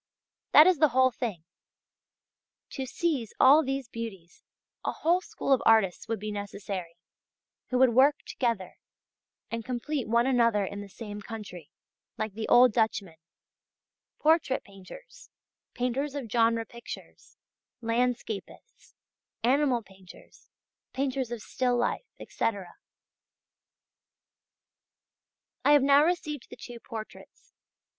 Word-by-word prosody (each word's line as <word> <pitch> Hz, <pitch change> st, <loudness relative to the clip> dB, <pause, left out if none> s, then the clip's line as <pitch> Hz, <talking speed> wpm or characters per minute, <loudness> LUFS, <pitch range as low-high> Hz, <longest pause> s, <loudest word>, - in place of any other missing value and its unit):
That 305 Hz, -, +9 dB
is 365 Hz, -4 st, +4 dB
the 310 Hz, -, +6 dB
whole 260 Hz, 0 st, +5 dB
thing. 230 Hz, -9 st, -4 dB, 1.3 s
To 265 Hz, -2 st, -5 dB
seize 270 Hz, -5 st, -2 dB
all 285 Hz, +4 st, +7 dB
these 270 Hz, -2 st, -3 dB
beauties, 205 Hz, -8 st, -8 dB, 0.4 s
a -, -, -1 dB
whole 345 Hz, +3 st, +1 dB
school 275 Hz, -, -1 dB
of 260 Hz, -, +2 dB
artists 220 Hz, -5 st, +3 dB
would 225 Hz, 0 st, -2 dB
be 215 Hz, +1 st, -5 dB
necessary, 200 Hz, -4 st, -6 dB, 0.7 s
who 255 Hz, -, -1 dB
would 255 Hz, -1 st, +5 dB
work 275 Hz, +4 st, +5 dB
together 230 Hz, -8 st, -2 dB, 0.7 s
and 230 Hz, 0 st, -3 dB
complete 255 Hz, +3 st, -3 dB
one 235 Hz, +2 st, +3 dB
another 230 Hz, -6 st, +3 dB
in 200 Hz, +1 st, -6 dB
the 205 Hz, -, -10 dB
same 205 Hz, 0 st, -8 dB
country, 200 Hz, -8 st, -9 dB, 0.5 s
like 215 Hz, -2 st, -3 dB
the 220 Hz, +1 st, -4 dB
old 245 Hz, -1 st, +6 dB
Dutchmen: 205 Hz, -7 st, 0 dB, 1.0 s
portrait 310 Hz, -4 st, +2 dB
painters, 200 Hz, -, -14 dB, 0.5 s
painters 270 Hz, +4 st, -2 dB
of 255 Hz, -7 st, -5 dB
genre 230 Hz, -1 st, +2 dB
pictures, 235 Hz, +1 st, -11 dB, 0.5 s
landscapists, 230 Hz, -2 st, -3 dB, 0.5 s
animal 255 Hz, -1 st, +2 dB
painters, 190 Hz, -2 st, -17 dB, 0.4 s
painters 265 Hz, -2 st, -1 dB
of 235 Hz, -3 st, -5 dB
still 250 Hz, -1 st, 0 dB
life, 240 Hz, -, -1 dB
etc. 200 Hz, -5 st, -3 dB, 2.9 s
I 290 Hz, -, +5 dB
have 290 Hz, -2 st, +5 dB
now 280 Hz, +1 st, +6 dB
received 305 Hz, -5 st, -2 dB
the -, -, -10 dB
two 240 Hz, -1 st, -10 dB
portraits. 220 Hz, -1 st, -10 dB
235 Hz, 120 wpm, -28 LUFS, 210-270 Hz, 2.9 s, That